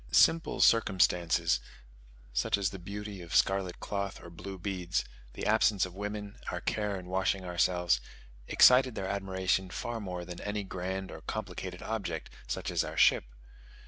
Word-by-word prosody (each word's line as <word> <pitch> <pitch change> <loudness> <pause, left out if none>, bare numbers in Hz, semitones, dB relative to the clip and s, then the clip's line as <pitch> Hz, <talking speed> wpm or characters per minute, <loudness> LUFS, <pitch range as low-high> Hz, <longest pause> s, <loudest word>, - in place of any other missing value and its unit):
Simple 165 - +4
circumstances 90 -6 +4 0.7
such - - +2
as 95 -2 0
the 95 - -7
beauty 100 +1 -6
of 85 -1 -6
scarlet 95 -2 +2
cloth 100 -1 -3
or 85 - -11
blue 95 +3 -8
beads, 90 -1 -2 0.3
the - - -5
absence 100 -4 +3
of 90 - -9
women, 105 +1 -5
our - - -3
care 105 -2 -1
in 90 - -10
washing 95 +1 0
ourselves, 90 -5 +2 0.5
excited 125 -1 +6
their 95 - -3
admiration 95 -1 0
far 115 +5 -4
more 90 -4 -5
than 90 -1 -8
any 105 0 -2
grand 95 0 -4
or - - -9
complicated 90 -1 -5
object, 95 -8 -3 0.2
such - - -3
as - - +1
our - - -6
ship. - - +5
95 Hz, 155 wpm, -31 LUFS, 90-100 Hz, 0.7 s, excited